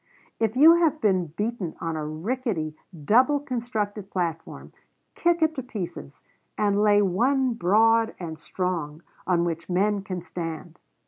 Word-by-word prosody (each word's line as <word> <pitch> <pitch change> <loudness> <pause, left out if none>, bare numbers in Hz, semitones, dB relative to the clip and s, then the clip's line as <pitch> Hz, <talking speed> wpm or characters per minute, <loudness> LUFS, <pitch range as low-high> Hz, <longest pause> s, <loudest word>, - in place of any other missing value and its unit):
"If 225 0 0
you 320 +6 +8
have 320 -3 +2
been 185 - +1
beaten 205 +2 -4
on 165 -1 -3
a 155 - -3
rickety, 165 - -3 0.3
double 255 - +4
construed 220 -6 -4
platform, 170 -4 -4 0.4
kick 340 -1 +1
it 315 0 +2
to 270 - -4
pieces, 185 - -7 0.3
and 205 -1 +2
lay 205 -1 +4
one 250 +7 +1
broad 225 +3 +3
and 160 -3 -6
strong, 165 -3 -4 0.2
on 175 -2 +2
which 170 0 -4
men 200 +3 +1
can 185 -3 -6
stand." 165 -2 -7
205 Hz, 140 wpm, -25 LUFS, 170-240 Hz, 0.4 s, you